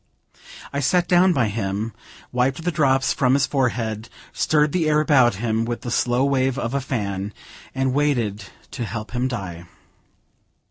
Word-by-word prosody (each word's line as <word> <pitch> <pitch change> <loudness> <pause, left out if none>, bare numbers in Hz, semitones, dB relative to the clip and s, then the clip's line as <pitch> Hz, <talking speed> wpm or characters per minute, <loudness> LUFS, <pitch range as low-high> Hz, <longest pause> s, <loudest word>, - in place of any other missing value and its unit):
I 140 - -1
sat 175 +6 +2
down 180 +1 +5
by 130 -9 +2
him, 100 +1 -3 0.4
wiped 130 +5 0
the 175 - 0
drops 135 -5 +2
from 130 -3 +2
his 140 0 +3
forehead, 115 -5 -1 0.2
stirred 150 -1 +2
the 165 -2 +1
air 150 0 +3
about 130 -7 +4
him 110 +2 -1
with 120 +1 -3
the 120 - -5
slow 125 +2 +2
wave 135 -1 +1
of 120 -3 -3
a 140 - 0
fan, 100 -6 -3 0.4
and 130 -1 0
waited 120 -9 0 0.3
to 120 - -4
help 105 +1 -6
him 125 +1 0
die. 95 -9 -6
125 Hz, 165 wpm, -22 LUFS, 110-140 Hz, 0.4 s, down